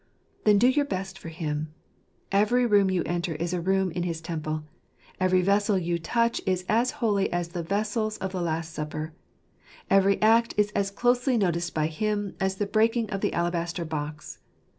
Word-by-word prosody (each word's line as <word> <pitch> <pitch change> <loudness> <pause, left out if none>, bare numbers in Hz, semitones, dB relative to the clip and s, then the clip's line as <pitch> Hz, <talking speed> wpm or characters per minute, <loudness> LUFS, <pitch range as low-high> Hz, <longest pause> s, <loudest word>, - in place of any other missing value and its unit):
Then 210 -1 +6
do 235 +5 +5
your 285 +3 +3
best 190 -5 -4
for 165 - -8
Him. 155 -1 -4 0.6
Every 215 +5 +3
room 205 -4 +4
you 185 -2 +1
enter 175 -1 -2
is 170 +3 -2
a 180 - -1
room 190 +1 +1
in 175 - -3
his 170 -2 -2
temple. 155 -2 -4 0.6
Every 185 -1 +3
vessel 200 +1 +2
you 170 -1 -1
touch 235 +7 0
is 185 -1 0
as 235 +3 +2 0.2
holy 200 -3 +1
as 175 -1 -1
the 175 0 -4
vessels 215 +4 -1
of 190 - -4
the 185 -1 -3
Last 165 -1 -2
Supper. 155 +1 -5 0.8
Every 195 0 +4
act 230 +2 +4
is 210 0 +2
as 200 -1 0
closely 245 +4 +2
noticed 170 -4 0
by 155 -1 +1
Him 205 +5 -2
as 190 0 0
the 205 - -1
breaking 225 +2 +1
of 195 - -3
the - - 0
alabaster 170 0 -1
box. 155 -1 -5
190 Hz, 185 wpm, -26 LUFS, 170-210 Hz, 0.8 s, Then